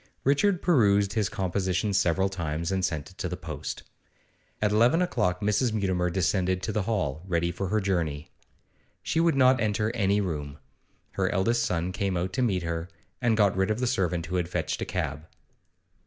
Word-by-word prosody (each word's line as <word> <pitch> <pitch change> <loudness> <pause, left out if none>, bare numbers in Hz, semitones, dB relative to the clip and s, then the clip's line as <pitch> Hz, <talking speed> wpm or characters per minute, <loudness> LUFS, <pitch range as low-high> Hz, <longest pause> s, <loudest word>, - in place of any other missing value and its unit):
Richard 170 +7 +2
perused 100 - +3
his 105 -4 0
composition 95 +1 -1
several 95 +1 +2
times, 85 -2 -3
and 95 -1 0
sent 80 -2 -2
it 95 - -23
to 95 - -2
the 90 - -4
post. 80 -5 -6 0.8
At 105 -1 +1
eleven 120 +9 +4
o'clock 105 - 0
Mrs. 105 +3 +1
Mutimer 95 -4 0
descended 90 +1 0
to 105 - -1
the 105 - 0
hall, 90 -9 -1
ready 85 -1 0
for 95 +3 -4
her 110 +4 +1
journey. 85 -7 -2 0.7
She 160 - 0
would 165 -2 +3
not 130 -1 +4
enter 105 0 0
any 100 -2 +2
room. 75 -7 -3 0.5
Her - - 0
eldest 115 +6 +1
son 90 0 -1
came 95 -1 -1
out 90 +2 -2
to 130 - 0
meet 95 -8 +1
her, 85 +1 -3 0.3
and 115 -3 +2
got 100 -4 +3
rid 95 +2 +1
of 110 +2 0
the 125 - 0
servant 90 -8 0
who 90 - -2
had 85 -1 -1
fetched - - -2
a - - -1
cab. 80 -4 -3
95 Hz, 185 wpm, -27 LUFS, 90-110 Hz, 0.8 s, eleven